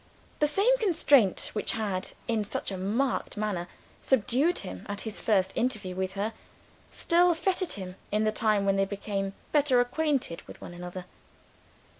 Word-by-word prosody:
The 300 - +4
same 400 +11 +3
constraint 290 - +3
which 210 - -1
had, 200 -4 -2
in 225 -3 +1
such 205 - -4
a 190 - -3
marked 225 +6 -1
manner, 200 -5 -2 0.3
subdued 265 - +2
him 90 0 -7
at 205 0 -3
his 220 -2 -5
first 190 -4 +2
interview 215 -7 -1
with 190 0 -2
her, 205 +3 -2 0.6
still 345 0 +3
fettered 370 +1 -1
him 185 -2 -6 0.2
in 210 +1 +2
the 215 - +2
time 215 -2 +2
when 195 0 +3
they 195 - +3
became 195 0 -3 0.2
better 285 -4 +4
acquainted 255 - 0
with - - -11
one - - -9
another. 180 +1 -7
215 Hz, 160 wpm, -28 LUFS, 195-275 Hz, 0.6 s, The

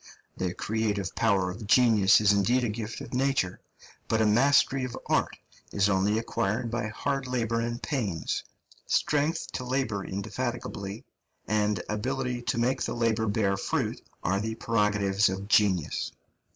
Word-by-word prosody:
The 90 -1 -2
creative 105 -4 -1
power 95 -5 +2
of 105 +3 -8
genius 110 -4 +5
is 105 -1 +4
indeed 120 +6 +2
a 120 - 0
gift 110 +3 -5
of 135 -3 -9
nature, 130 -8 0 0.5
but 110 - +1
a 110 - +3
mastery 135 +4 +4
of 125 -2 -4
art - - 0 0.3
is 100 0 +2
only 100 +2 +2
acquired 115 +1 -1
by 120 -1 -1
hard 135 +4 -2
labour 115 -2 0
and 120 0 -3
pains; 105 - -2 0.4
strength 150 +2 +1
to 125 - -4
labour 125 -6 -1
indefatigably 105 0 -4 0.4
and 105 -2 +1
ability 125 +3 -2
to 115 -1 -2
make 125 +3 +1
the - - -2
labour 115 -1 +1
bear 100 -1 +1
fruit - - -2 0.2
are 95 +2 +1
the 110 +2 -3
prerogatives 105 -3 +2
of 95 +1 -4
genius. 100 -7 +2
110 Hz, 150 wpm, -28 LUFS, 100-125 Hz, 0.5 s, genius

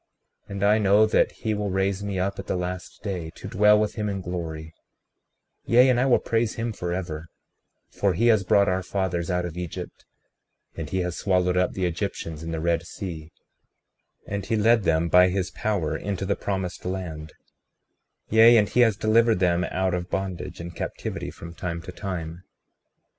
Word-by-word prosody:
36:28 - - -9
And 100 0 -3
I 105 +1 +5
know 105 +1 +5
that 110 - +2
he 110 -2 -3
will 105 -1 -2
raise 95 +1 0
me 100 -2 -3
up 95 +2 -1
at - - -7
the - - -1
last 90 +1 -5
day, 90 -6 -4
to - - -8
dwell 105 0 +5
with 105 -1 0
him 105 -1 -2
in 100 -1 -3
glory; 80 -3 -5 0.9
yea, 125 +3 +5
and 125 -1 +3
I 130 - +2
will 125 - +5
praise 115 -1 -1
him 115 0 -3
forever, 85 -4 -4 0.6
for 100 -3 0
he 115 - +1
has 110 -3 +4
brought 100 +2 +4
our 95 0 +1
fathers 90 -2 -2
out 90 -1 0
of 85 -2 -6
Egypt, 90 -3 -7 0.7
and 80 -3 -5
he 95 +2 -1
has 90 -1 -3
swallowed 90 -2 +1
up 90 0 +1
the 95 - -1
Egyptians 85 -3 -4
in 80 - -6
the 80 -1 -3
Red 85 0 +1
Sea; 80 -4 -7 0.9
and 100 0 -4
he 110 - -1
led 110 0 +3
them 80 +1 +2
by 90 +2 +6
his 95 0 -2
power 100 -8 -1
into 100 -1 -3
the 100 - 0
promised 95 -3 -4
land; 85 -5 -5 1.0
yea, 115 +2 +8
and 105 -2 +3
he - - 0
has 115 -5 +5
delivered 115 0 +3
them 90 -1 +2
out 95 +1 -1
of 90 0 -3
bondage 95 -2 -4
and 85 0 -7
captivity - - -4
from 85 0 -10
time 85 -1 -4
to 95 - -8
time. 90 -3 -6
95 Hz, 190 wpm, -25 LUFS, 85-105 Hz, 1.0 s, yea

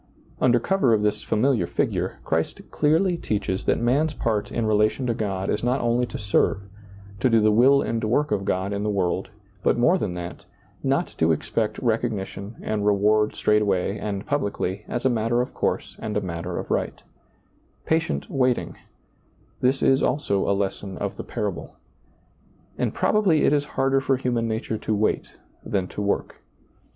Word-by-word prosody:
Under 120 -1 +4
cover 135 -6 +2
of 105 - -1
this 105 0 0
familiar 110 -5 +1
figure, - - -1
Christ - - -1
clearly 165 +4 +2
teaches 100 - -2
that - - +2
man's 140 +6 +1
part 105 -3 -1
in 115 - -1
relation 110 +4 +2
to 120 - +1
God 95 -4 -2
is 105 - -1
not 125 +3 +1
only 120 +1 +1
to - - -6
serve, 100 -1 +1 0.6
to 130 - +3
do 115 -1 +5
the 110 0 +4
will 135 +6 +5
and 115 0 -2
work 135 +7 +1
of 100 -2 0
God 95 +1 -1
in 100 - -2
the 105 - -1
world, 95 +1 -1 0.3
but - - +2
more 170 +10 +4
than 95 - -2
that, 85 0 -7 0.4
not - - +1
to 80 0 +4
expect 105 +7 -1
recogni 115 -4 0
tion 100 +4 -9
and 105 -1 -1
reward 105 +1 +3
straightway 100 -2 +1
and 100 -1 -4
publicly, 100 -8 -2
as 120 - -3
a - - +7
matter 115 +1 +1
of 125 - -2
course - - -2
and 110 -2 -3
a - - 0
matter 85 -3 -4
of - - -5
right - - -2 0.8
Patient 160 - 0
waiting; 130 -2 0 0.8
this 130 +2 +1
is 135 +1 +4
also 100 -11 0
a - - +4
lesson 100 -1 -3
of - - -3
the - - -6
parable. 100 -5 -4 1.0
And - - -1
probably 195 -8 +2
it - - +4
is 145 -1 +2
harder 135 0 +3
for 135 -1 +1
human 120 -3 -1
nature 110 0 -2
to 110 - -1
wait 105 +1 0 0.3
than 95 -3 -1
to - - -5
work. 100 0 -2
110 Hz, 175 wpm, -24 LUFS, 100-125 Hz, 1.0 s, a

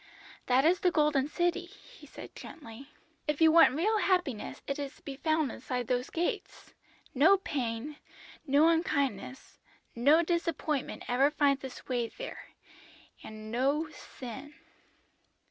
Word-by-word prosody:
"'That 260 +3 +4
is 355 +3 +4
the 360 - +3
Golden 300 -4 +2
City,' 350 +3 -1
he 400 +3 -17
said - - -11
gently. 270 -2 -11 0.4
'If 300 -1 -1
you 320 -1 +6
want 325 -5 +6
real 425 +8 +1
happiness 355 - -1
it 275 +1 -3
is 285 0 -5
to - - -23
be 275 - -6
found 310 -1 0
inside 250 0 -4
those 250 0 -1
gates; 340 +1 -4 0.4
no 315 +9 +6
pain, 270 -4 -4 0.5
no 285 +4 +5
unkindness, 280 - -1 0.4
no 290 +8 +5
disappointment 330 -4 -2
ever 265 +4 +3
finds 285 -2 +1
its 265 -1 -9
way 245 -2 -1
there, - - -8 0.8
and 215 0 -9
no 280 +6 0
sin.' 275 +1 -10
285 Hz, 135 wpm, -30 LUFS, 255-325 Hz, 0.8 s, you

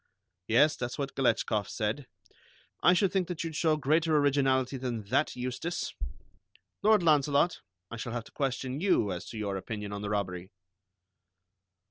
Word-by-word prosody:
"Yes, 145 +7 +4
that's 125 0 -4
what 140 -1 -3
Galetchkoff 110 -5 +1
said. 115 +5 -2 0.7
I 175 - +6
should 185 +1 +2
think 190 -3 +1
that 175 -2 -4
you'd 165 -2 -5
show 155 -1 +2
greater 155 +2 +2
originality 135 -2 +2
than 120 -4 -3
that, 140 +5 +1
Eustace. 130 +8 -3 0.9
Lord 215 -2 +5
Launcelot, 150 +1 +3 0.3
I 115 - -5
shall 115 +1 -5
have 120 -2 -3
to - - -16
question 135 0 -2
you 180 - +2
as 90 +3 -5
to 115 - -7
your 100 -2 -2
opinion 105 +1 -5
on 100 - -4
the 105 - -3
robbery." 95 -3 -2
130 Hz, 155 wpm, -30 LUFS, 110-155 Hz, 0.9 s, I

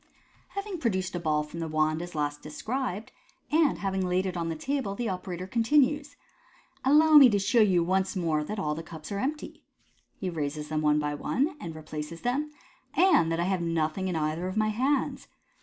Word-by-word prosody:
— - - -33
Having 400 -3 -4
produced 190 -8 -1
a 175 - -2
ball 155 -2 +1
from 150 +3 -9
the 165 - -3
wand 155 +1 +1
as 175 -1 -8
last 145 -1 -2
described, 220 - -4 0.4
and 315 -1 +3
having 190 -1 -1
laid 180 +1 +1
it 185 -1 -3
on 170 -1 -2
the 165 - -2
table, 260 - -2
the 240 +2 -2
operator 185 -2 -4
continues, 285 +7 +2 0.2
— - - -30
" - - -36
Allow 305 +3 +6
me 270 -4 +10
to 205 - +2
show 225 +4 +3
you 185 -5 +4
once 190 +3 0
more 160 -4 0
that 210 +8 -5
all 150 -6 -1
the 160 - -5
cups 160 +2 -10
are 200 - -2
empty 300 +6 -4 0.3
" - - -40
(he 190 - -3
raises 150 -3 -3
them 155 0 -1
one 150 -1 +3
by 150 -1 -1
one, 275 - -1
and 165 -1 -6
replaces 155 +1 -7
them), 275 +5 -1 0.5
"and 325 - +5
thac 165 - 0
I - - +2
have 185 0 0
nothing 165 +2 -1
in 180 - -2
either 160 +3 -1
of 185 +3 -4
my 215 0 +2
hands. 260 +6 0
185 Hz, 215 wpm, -28 LUFS, 160-245 Hz, 0.5 s, me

